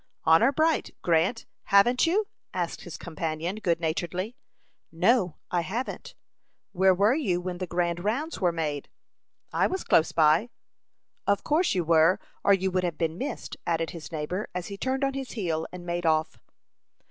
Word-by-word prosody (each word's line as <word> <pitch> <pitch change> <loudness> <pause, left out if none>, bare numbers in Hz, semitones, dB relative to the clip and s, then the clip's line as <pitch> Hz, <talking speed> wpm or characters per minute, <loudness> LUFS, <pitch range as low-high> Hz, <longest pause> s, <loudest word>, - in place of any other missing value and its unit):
"Honor 165 +11 +5
bright, 315 +3 +1
Grant, 175 +7 +2 0.2
haven't 240 +9 +4
you?" 410 +6 +2 0.3
asked 175 -2 -2
his 175 - -8
companion, 165 +2 -4
good 170 -6 0
naturedly. 175 +6 -2 0.6
"No, 180 0 +2 0.2
I 175 - +2
haven't." 225 +10 -5 0.6
"Where 190 0 +4
were 205 +5 +4
you 205 - 0
when 180 0 -5
the 185 - -3
grand 175 0 -1
rounds 270 +10 -2
were 180 -2 +3
made?" 150 -4 -3 0.6
"I - - +3
was 375 +1 -3
close 160 - +3
by." 160 +8 +4 0.8
"Of 200 0 +2
course 320 - +2
you 180 - +1
were, 165 +4 +4 0.2
or - - +4
you 190 -1 +3
would 185 0 0
have 170 -3 -2
been 165 +1 -2
missed," 270 -2 -5
added 165 -2 0
his 165 -1 -9
neighbor, 165 +6 -3
as 180 +2 -4
he 200 - -5
turned 265 +4 -1
on 275 0 +1
his 270 -1 -5
heel 165 -8 -2
and 180 -1 -9
made 175 -1 -2
off. 155 0 +1
180 Hz, 170 wpm, -27 LUFS, 165-220 Hz, 0.8 s, Honor